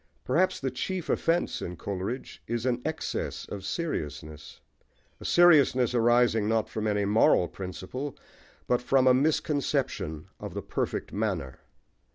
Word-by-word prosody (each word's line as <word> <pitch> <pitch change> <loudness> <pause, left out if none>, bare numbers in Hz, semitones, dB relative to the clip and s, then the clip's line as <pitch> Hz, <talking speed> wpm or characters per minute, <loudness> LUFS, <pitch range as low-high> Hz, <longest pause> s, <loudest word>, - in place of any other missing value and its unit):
Perhaps 185 +3 +1
the 130 -1 -2
chief 175 +7 -3
offence 170 +1 0
in 90 0 -5
Coleridge 100 +8 -5
is 120 0 -2
an 125 -1 0
excess 160 0 -3
of 100 -2 -7
seriousness, 75 - -5 0.6
a - - -10
seriousness 145 -8 +5
arising 120 -2 +3
not 110 -1 +1
from 110 0 -3
any 105 -1 +1
moral 100 -4 +4
principle, 95 +11 -6 0.5
but 125 0 +1
from 130 +1 +3
a 130 - +7
misconception 140 - 0
of - - -7
the - - -4
perfect - - -3
manner. 95 -11 -2
120 Hz, 135 wpm, -28 LUFS, 100-140 Hz, 0.6 s, a